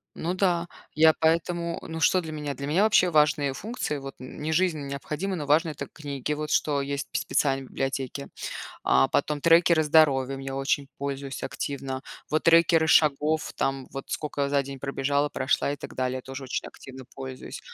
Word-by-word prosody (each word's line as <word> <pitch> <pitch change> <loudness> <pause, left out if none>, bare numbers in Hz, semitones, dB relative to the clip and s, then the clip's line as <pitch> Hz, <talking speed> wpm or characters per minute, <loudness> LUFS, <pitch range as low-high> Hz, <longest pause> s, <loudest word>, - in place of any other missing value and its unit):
ну 175 +3 -2
да, 175 -3 +1 0.3
я 160 0 +6
поэтому, 170 +1 +1
ну 160 0 -6
что 185 +3 +4
для 160 -1 -7
меня? 150 -2 -4
Для 140 0 -6
меня 175 +8 +3
вообще 205 -4 +4
важные 150 -3 +3
функции, 205 - -4
вот 135 0 -7
нь 130 +1 -10
не 155 +2 -2
жизненно 160 -5 +1
необходимы, 150 +7 -3
но 150 -4 -4
важны- 160 +3 +3
это 150 - -6
книги, 145 -2 -5
вот 150 0 -4
что 145 -2 +2
есть 140 0 -3
п - - -1
специальные 135 -2 0
библиотеки, 135 +1 -3 0.6
а, 65 +1 +4
потом 145 0 0
трекеры 170 -1 +5
здоровья, 140 -4 +4
ими 135 0 -6
очень 135 +1 -1
пользуюсь 140 0 -4
активно, 135 -1 -4 0.3
вот 155 - +1
трекеры 165 -1 +5
шагов, 150 +1 +3
там, 135 -1 -1
вот 135 - -5
скока 145 -2 -3
я 140 - +1
за 140 -1 +2
день 135 0 -8
пробежала, 140 +1 0
прошла 140 +1 0
и - - -4
так - - -9
далее, 130 0 -1
тоже 135 +2 -8
очень 125 - -3
активно 130 -1 -11
пользуюсь. 130 -1 -7
145 Hz, 185 wpm, -26 LUFS, 135-160 Hz, 0.6 s, я